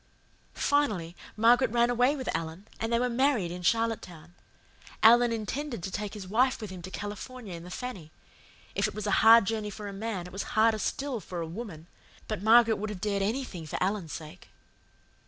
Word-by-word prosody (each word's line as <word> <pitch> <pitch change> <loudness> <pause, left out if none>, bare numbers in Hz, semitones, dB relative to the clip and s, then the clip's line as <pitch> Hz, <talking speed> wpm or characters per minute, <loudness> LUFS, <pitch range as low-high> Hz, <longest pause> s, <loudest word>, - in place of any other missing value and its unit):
"Finally, 210 - 0 0.2
Margaret 240 +3 +5
ran 240 +1 +2
away 250 +4 +3
with 265 -3 -3
Alan, 165 +5 -5
and 225 +1 -2
they 235 - +3
were 250 +1 +1
married 245 -7 +1
in 180 +1 -6
Charlottetown. 180 -6 -1 0.7
Alan 240 +2 +7
intended 230 - -4
to 190 - -4
take 210 +2 -4
his 195 -3 -7
wife 255 +6 +2
with 215 -4 -7
him 185 -2 -8
to 180 - -8
California 205 +2 -7
in 170 -1 -8
the 180 - -10
Fanny. 185 -7 -6 0.6
If - - +1
it - - -8
was 215 -1 -4
a 205 - 0
hard 225 -1 +8
journey 215 0 -2
for 205 0 -7
a 200 - -6
man 200 -3 -4
it 180 - -11
was 195 - -3 0.2
harder 220 0 +4
still 270 +3 -2
for 180 -2 -7
a 165 - -2
woman, 165 -2 -8 0.4
but 215 -3 -3
Margaret 225 +1 +6
would 215 +2 -4
have 205 -3 -6
dared 200 0 -1
anything 205 - -3
for - - -4
Alan's 185 -4 -1
sake. 155 -1 -9
215 Hz, 195 wpm, -29 LUFS, 185-235 Hz, 0.7 s, hard